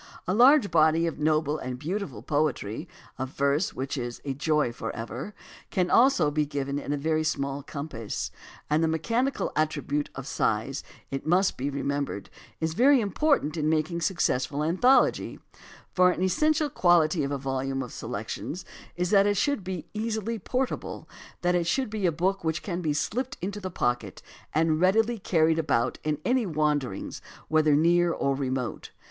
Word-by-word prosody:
A 185 Hz, -, +1 dB
large 250 Hz, -, +6 dB
body 160 Hz, +1 st, +4 dB
of 165 Hz, -3 st, -3 dB
noble 155 Hz, 0 st, +1 dB
and 130 Hz, -1 st, -5 dB
beautiful 155 Hz, -, -4 dB
poetry, 145 Hz, -, -1 dB, 0.3 s
of 130 Hz, 0 st, -2 dB
verse 140 Hz, +6 st, 0 dB
which 135 Hz, +2 st, -3 dB
is 120 Hz, -1 st, -5 dB
"a 135 Hz, -, -1 dB
joy 150 Hz, -2 st, +1 dB
forever," 115 Hz, -, -6 dB, 0.3 s
can 180 Hz, -1 st, 0 dB
also 230 Hz, -, +5 dB
be 150 Hz, +1 st, +1 dB
given 140 Hz, -1 st, -3 dB
in 145 Hz, -, -5 dB
a 145 Hz, -, 0 dB
very 155 Hz, +2 st, 0 dB
small 140 Hz, -2 st, -1 dB
compass. 140 Hz, -6 st, -5 dB, 0.4 s
And 155 Hz, +2 st, +2 dB
the -, -, +3 dB
mechanical 230 Hz, -, 0 dB
attribute 150 Hz, -1 st, -1 dB
of 135 Hz, -, -6 dB
size, 120 Hz, +3 st, -1 dB, 0.3 s
it 135 Hz, +2 st, -4 dB
must 185 Hz, +3 st, +3 dB
be 135 Hz, +3 st, -2 dB
re 140 Hz, 0 st, -4 dB
membered, 140 Hz, -8 st, -3 dB, 0.3 s
is 160 Hz, 0 st, -1 dB
very 265 Hz, -, +5 dB
important 210 Hz, -, +1 dB
in 155 Hz, -2 st, 0 dB
making 160 Hz, +2 st, 0 dB
a -, -, -9 dB
successful 150 Hz, -6 st, 0 dB
anthology, 215 Hz, -, +3 dB, 0.5 s
for 180 Hz, 0 st, +5 dB
an 180 Hz, 0 st, -1 dB
essential 305 Hz, -, +2 dB
quality 170 Hz, -5 st, +3 dB
of 140 Hz, -, -1 dB
a 140 Hz, -, -1 dB
volume 135 Hz, 0 st, -2 dB
of 125 Hz, -, -9 dB
se -, -, -7 dB
lections 125 Hz, -, -5 dB, 0.3 s
is 180 Hz, 0 st, -1 dB
that 200 Hz, -1 st, +5 dB
it 205 Hz, -1 st, +1 dB
should 285 Hz, -2 st, +1 dB
be 185 Hz, -3 st, -5 dB
easily 220 Hz, +1 st, -2 dB
portable, 255 Hz, +6 st, -3 dB, 0.4 s
that 175 Hz, 0 st, +3 dB
it 175 Hz, -1 st, +1 dB
should 260 Hz, +4 st, 0 dB
be 210 Hz, -4 st, 0 dB
a -, -, +2 dB
book 185 Hz, +4 st, -1 dB
which 160 Hz, -1 st, -1 dB
can 180 Hz, -3 st, -3 dB
be 155 Hz, -3 st, 0 dB
slipped 240 Hz, -, -2 dB
into 200 Hz, +4 st, -4 dB
the 190 Hz, -2 st, -5 dB
pocket 120 Hz, -, -2 dB, 0.3 s
and 155 Hz, +1 st, +2 dB
readily 225 Hz, +5 st, +3 dB
carried 160 Hz, -3 st, +2 dB
about 125 Hz, -6 st, 0 dB
in 150 Hz, -1 st, 0 dB
any 250 Hz, -3 st, +2 dB
wanderings 150 Hz, -, -1 dB, 0.3 s
whether 155 Hz, -2 st, +4 dB
near 170 Hz, +3 st, +4 dB
or 140 Hz, -4 st, 0 dB
remote. 130 Hz, -3 st, -3 dB
155 Hz, 175 wpm, -27 LUFS, 140-190 Hz, 0.5 s, large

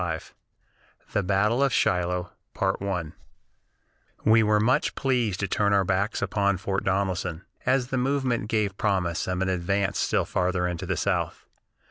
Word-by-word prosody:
IV 80 Hz, -, -12 dB, 0.8 s
THE 105 Hz, -, +2 dB
BATTLE 100 Hz, +6 st, +2 dB
OF 140 Hz, -1 st, +3 dB
SHILOH 90 Hz, -3 st, +1 dB, 1.9 s
We 110 Hz, +1 st, +6 dB
were 105 Hz, -1 st, +3 dB
much 115 Hz, +5 st, +2 dB
pleased 120 Hz, -8 st, 0 dB
to 100 Hz, -, 0 dB
turn 100 Hz, +2 st, +1 dB
our 100 Hz, -1 st, +4 dB
backs 95 Hz, +4 st, 0 dB
upon 100 Hz, -1 st, +1 dB
Fort 95 Hz, +1 st, -2 dB
Donelson, 95 Hz, -3 st, -1 dB, 0.2 s
as 130 Hz, -1 st, +2 dB
the 130 Hz, -, 0 dB
movement 130 Hz, -4 st, 0 dB
gave 105 Hz, -4 st, 0 dB
promise 95 Hz, -6 st, 0 dB
of 90 Hz, 0 st, 0 dB
an 95 Hz, -, -1 dB
advance 95 Hz, +2 st, 0 dB
still -, -, +1 dB
farther 90 Hz, 0 st, 0 dB
into 90 Hz, -2 st, -4 dB
the -, -, -1 dB
South. -, -, -1 dB
100 Hz, 145 wpm, -26 LUFS, 90-110 Hz, 1.9 s, We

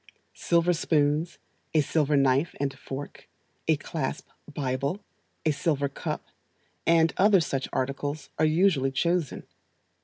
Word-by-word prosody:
Silver 170 Hz, +1 st, +2 dB
spoons, 155 Hz, 0 st, +1 dB, 0.4 s
a 155 Hz, -, +6 dB
silver 150 Hz, 0 st, +1 dB
knife 135 Hz, +3 st, +2 dB
and 140 Hz, -1 st, -1 dB
fork, 140 Hz, +2 st, -8 dB, 0.4 s
a 160 Hz, -, +5 dB
clasp 145 Hz, -1 st, -4 dB, 0.2 s
bible, 140 Hz, +5 st, -2 dB, 0.5 s
a 155 Hz, -, +4 dB
silver 145 Hz, -1 st, 0 dB
cup, -, -, -5 dB, 0.6 s
and 165 Hz, -1 st, +4 dB
other 200 Hz, 0 st, +6 dB
such 135 Hz, -4 st, -2 dB
articles, 145 Hz, +3 st, -3 dB
are 155 Hz, -, +4 dB
usually 155 Hz, -4 st, +3 dB
chosen. 170 Hz, +2 st, 0 dB
150 Hz, 120 wpm, -27 LUFS, 140-165 Hz, 0.6 s, a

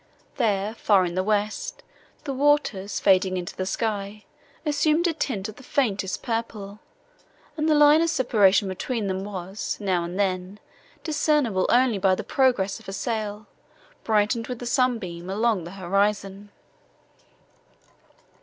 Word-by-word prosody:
There, 210 Hz, -4 st, 0 dB
far 200 Hz, -4 st, +3 dB
in 175 Hz, -, -4 dB
the 185 Hz, -, 0 dB
west, 215 Hz, -, -2 dB, 0.4 s
the 275 Hz, -, -3 dB
waters, 265 Hz, -8 st, +1 dB
fading 185 Hz, -1 st, +3 dB
into 175 Hz, -1 st, -5 dB
the 185 Hz, -, -3 dB
sky, 210 Hz, 0 st, -3 dB, 0.4 s
assumed 305 Hz, +3 st, +2 dB
a 340 Hz, -, +2 dB
tint 230 Hz, -10 st, -3 dB
of 215 Hz, -, -10 dB
the -, -, -12 dB
faintest 200 Hz, -9 st, -1 dB
purple, 220 Hz, -4 st, -4 dB, 0.8 s
and 310 Hz, 0 st, 0 dB
the 305 Hz, -, +4 dB
line 295 Hz, +1 st, +6 dB
of 335 Hz, -, +2 dB
separation 210 Hz, -9 st, +3 dB
between 210 Hz, +4 st, -3 dB
them 190 Hz, 0 st, -2 dB
was, 195 Hz, 0 st, -5 dB
now 185 Hz, -4 st, 0 dB
and 175 Hz, +3 st, -5 dB
then, 190 Hz, 0 st, -1 dB, 0.4 s
discernible 295 Hz, -, +1 dB
only 245 Hz, -4 st, +3 dB
by 190 Hz, 0 st, +3 dB
the -, -, -5 dB
progress 250 Hz, -8 st, +1 dB
of -, -, -17 dB
a -, -, -5 dB
sail, 215 Hz, -1 st, -3 dB, 0.6 s
brightened 220 Hz, +1 st, +1 dB
with 250 Hz, -, -4 dB
the 245 Hz, -, -7 dB
sunbeam, 225 Hz, -9 st, -1 dB
along 210 Hz, -2 st, 0 dB
the 175 Hz, -, -9 dB
horizon. 195 Hz, +2 st, -1 dB
210 Hz, 145 wpm, -25 LUFS, 190-250 Hz, 0.8 s, line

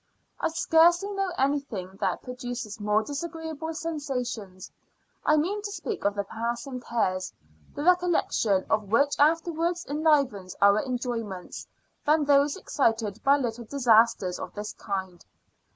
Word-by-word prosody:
I -, -, +1 dB
scarcely 340 Hz, +4 st, +4 dB
know 390 Hz, -2 st, -1 dB
anything 260 Hz, -10 st, -1 dB
that -, -, -1 dB
produces 245 Hz, -4 st, -6 dB
more 210 Hz, +1 st, +2 dB
disagreeable 320 Hz, +3 st, -5 dB
sensations, 250 Hz, -, -4 dB, 0.5 s
I 305 Hz, -, +4 dB
mean 380 Hz, +8 st, 0 dB
to 405 Hz, 0 st, -5 dB
speak 420 Hz, -, -5 dB
of 200 Hz, 0 st, +2 dB
the 200 Hz, -, -1 dB
passing 235 Hz, +5 st, -4 dB
cares, 190 Hz, -6 st, -1 dB, 0.4 s
the 290 Hz, -, -3 dB
recollection 345 Hz, -, +2 dB
of 215 Hz, -2 st, 0 dB
which 280 Hz, +5 st, +3 dB
afterwards 330 Hz, +3 st, +2 dB
enlivens 280 Hz, -, +1 dB
our 200 Hz, +1 st, +5 dB
enjoyments, 235 Hz, -7 st, -4 dB, 0.4 s
than 300 Hz, 0 st, +3 dB
those 285 Hz, 0 st, +3 dB
excited 225 Hz, -5 st, 0 dB
by 280 Hz, +1 st, +5 dB
little 240 Hz, -3 st, -3 dB
disasters 225 Hz, -7 st, +3 dB
of -, -, -7 dB
this 210 Hz, 0 st, -5 dB
kind. 190 Hz, -4 st, -5 dB
250 Hz, 130 wpm, -27 LUFS, 210-315 Hz, 0.5 s, our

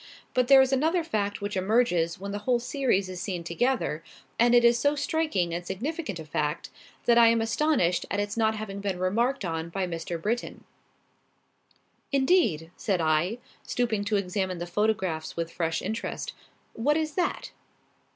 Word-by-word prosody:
But 250 Hz, -1 st, +2 dB
there 270 Hz, 0 st, +8 dB
is 265 Hz, 0 st, -1 dB
another 320 Hz, +6 st, +2 dB
fact 205 Hz, -11 st, -2 dB
which 205 Hz, 0 st, -3 dB
emerges 185 Hz, -4 st, +1 dB
when 200 Hz, +1 st, -5 dB
the 205 Hz, -, -3 dB
whole 245 Hz, +4 st, +1 dB
series 245 Hz, -5 st, 0 dB
is 185 Hz, -1 st, -6 dB
seen 180 Hz, -4 st, -3 dB
together, 170 Hz, -2 st, -1 dB, 0.4 s
and 240 Hz, +1 st, +5 dB
it 240 Hz, 0 st, +6 dB
is 235 Hz, 0 st, +5 dB
so 285 Hz, +3 st, +2 dB
striking 285 Hz, -, 0 dB
and 175 Hz, +1 st, -3 dB
significant 225 Hz, -, -4 dB
a 160 Hz, -, -8 dB
fact, 150 Hz, +1 st, -2 dB, 0.3 s
that 235 Hz, 0 st, +5 dB
I 230 Hz, -, +8 dB
am 230 Hz, 0 st, +4 dB
astonished 225 Hz, -, +1 dB
at 205 Hz, -, -1 dB
its 205 Hz, 0 st, -2 dB
not 220 Hz, -1 st, +2 dB
having 205 Hz, -2 st, -5 dB
been 200 Hz, -2 st, -2 dB
remarked 225 Hz, +7 st, 0 dB
on 165 Hz, -1 st, -3 dB
by 190 Hz, +2 st, -2 dB
Mr. 170 Hz, -1 st, -4 dB
Britton." 230 Hz, +8 st, -3 dB, 1.5 s
"Indeed!" 265 Hz, -, +2 dB
said 195 Hz, -5 st, -1 dB
I, 160 Hz, +6 st, +1 dB, 0.2 s
stooping 230 Hz, -4 st, -1 dB
to 210 Hz, 0 st, 0 dB
examine 190 Hz, -1 st, -2 dB
the 170 Hz, -, -4 dB
photographs 185 Hz, -5 st, -1 dB
with 165 Hz, 0 st, -2 dB
fresh 165 Hz, -1 st, -2 dB
interest; 220 Hz, +4 st, -4 dB, 0.4 s
"what 290 Hz, +7 st, +1 dB
is 310 Hz, -1 st, -2 dB
that?" 355 Hz, +2 st, -2 dB
205 Hz, 170 wpm, -27 LUFS, 175-245 Hz, 1.5 s, there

